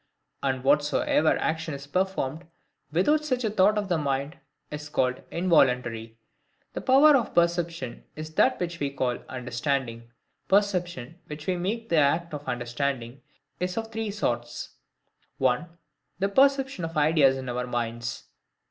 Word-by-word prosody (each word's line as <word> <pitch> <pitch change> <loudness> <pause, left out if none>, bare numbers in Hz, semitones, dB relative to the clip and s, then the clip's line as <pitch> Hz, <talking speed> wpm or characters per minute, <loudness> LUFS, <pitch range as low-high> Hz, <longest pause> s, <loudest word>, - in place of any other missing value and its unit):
And 130 -2 -1
whatsoever 150 - +3
action 160 -1 -2
is 140 0 -9
performed 165 -2 -2 0.4
without 295 - +3
such 255 -4 -1
a 220 - 0
thought 210 +1 +4
of 205 -1 -1
the 175 -4 +1
mind, 140 +1 -2 0.3
is 150 0 -6
called 130 -3 0
INVOLUNTARY. 125 -10 +1 0.6
The - - -4
power 280 +3 +6
of 245 -5 0
perception 170 -6 0
is 155 +1 -7
that - - +3
which 170 -1 -3
we 140 - 0
call 130 -3 -1
the - - -16
UNDERSTANDING. 120 -1 -3 0.4
Perception, 180 -7 0
which 150 0 -8
we 185 - 0
make 215 +6 -3
the 170 - +2
act 155 +3 +2
of 145 0 -6
the - - -4
understanding, 120 +1 -3 0.4
is 180 +2 -2
of 225 0 -3
three 220 -1 -3
sorts:—1. 125 - -3 0.5
The 195 +2 0
perception 270 -2 +3
of 165 0 -4
ideas 150 -3 +4
in 130 -1 -6
our 125 0 -2
minds. 120 0 -3
155 Hz, 150 wpm, -26 LUFS, 130-185 Hz, 0.6 s, power